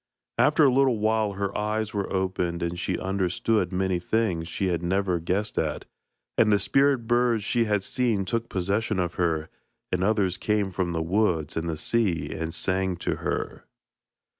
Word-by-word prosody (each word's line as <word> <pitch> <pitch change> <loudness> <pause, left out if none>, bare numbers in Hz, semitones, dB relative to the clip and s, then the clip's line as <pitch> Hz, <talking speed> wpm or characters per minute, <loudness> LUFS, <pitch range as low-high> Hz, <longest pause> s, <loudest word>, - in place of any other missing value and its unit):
After 150 +1 +5
a 135 -3 +5
little 130 -3 +3
while 110 -1 +1
her 100 0 -3
eyes 105 +1 -1
were 100 -2 -2
opened, 90 -3 -1
and 85 +1 -3
she - - -1
understood 95 +1 0
many 95 -1 0
things 90 -4 0
she 95 +2 -1
had 85 -2 -1
never 90 0 0
guessed 95 +6 -1
at, 75 -2 -2 0.5
and 105 - +5
the 105 - +5
spirit 135 +1 +2
birds 120 -2 +2
she 120 +2 +1
had 105 -2 0
seen 115 -5 0
took 115 +3 -2
possession 100 +3 -1
of 90 -1 -1
her, 80 -2 0 0.4
and 90 0 0
others 95 -3 +1
came 105 -1 0
from 90 -1 -1
the 80 -1 -1
woods 85 -4 0
and 80 +1 -2
the 80 - -3
sea, 100 -1 0
and 80 0 -4
sang 95 -1 0
to - - -2
her. - - -4
95 Hz, 175 wpm, -26 LUFS, 90-110 Hz, 0.5 s, After